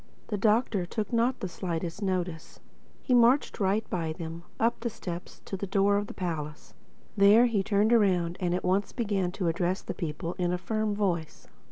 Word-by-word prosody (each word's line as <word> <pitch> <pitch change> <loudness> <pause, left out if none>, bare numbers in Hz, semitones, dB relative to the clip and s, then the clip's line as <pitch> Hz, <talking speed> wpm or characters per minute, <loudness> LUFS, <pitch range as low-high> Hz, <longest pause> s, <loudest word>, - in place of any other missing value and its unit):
The 210 - -1
Doctor 210 -3 +2
took 215 +3 -3
not 240 +3 +1
the 190 - -2
slightest 175 0 -4
notice. 180 -4 -3 0.4
He 255 - +1
marched 245 +3 +4
right 200 +2 +1
by 165 -3 -1
them, 165 0 -7 0.2
up 230 +1 +1
the 235 - -2
steps 175 -5 -7
to - - -4
the 195 +1 -4
door 200 +1 +3
of 205 0 -2
the - - -8
palace. 155 -4 -5 0.4
There 205 +4 +7
he 225 -5 +1
turned 210 +3 +2
around 180 -6 +3
and 175 -1 0
at 180 - -3
once 190 +2 +1
began 200 -6 -1
to 185 -3 -2
address 175 +3 0
the - - -4
people 165 0 -4
in 175 -1 +1
a 180 - 0
firm 215 +3 -1
voice. 175 -6 -2
195 Hz, 190 wpm, -28 LUFS, 175-215 Hz, 0.4 s, There